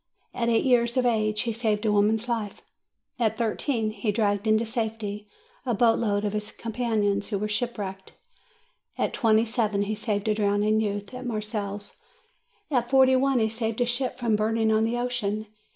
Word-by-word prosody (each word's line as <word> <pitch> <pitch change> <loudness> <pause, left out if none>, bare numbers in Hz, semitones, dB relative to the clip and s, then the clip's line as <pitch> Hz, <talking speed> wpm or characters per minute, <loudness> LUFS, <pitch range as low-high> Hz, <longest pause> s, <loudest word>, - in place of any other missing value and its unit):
At 235 -1 0
eight 225 -1 +2
years 240 -1 +3
of 255 - +3
age, 215 -3 +1
he 235 -2 -2
saved 215 -1 0
a 215 - +3
woman's 215 +3 +2
life; 225 -4 -3 0.6
at 225 -3 +1
thirteen, 230 0 -1
he 210 0 -1
dragged 205 -1 0
into 220 +1 +3
safety 220 -3 -3 0.4
a 245 -3 0
boat 230 +1 +4
load 205 -2 0
of 205 - -1
his 210 0 -3
companions 215 -3 -1
who 205 - -2
were 210 +2 -2
shipwrecked; 210 -4 -4 0.8
at - - 0
twenty 225 -1 +3
seven, 215 -3 0
he 210 +1 -2
saved 210 -1 -2
a 215 - +3
drowning 210 +1 +2
youth, 205 +1 -3
at 250 0 -6
Marseilles; 210 -2 -4 0.8
at 245 -3 +1
forty 265 -1 +5
one, 270 0 +2
he 220 -2 +3
saved 225 0 -3
a 245 - +3
ship 245 +2 -2
from 235 -4 +1
burning 220 +1 +1
on 220 0 +3
the 235 +2 -1
ocean. 220 -4 -2
220 Hz, 180 wpm, -26 LUFS, 210-235 Hz, 0.8 s, forty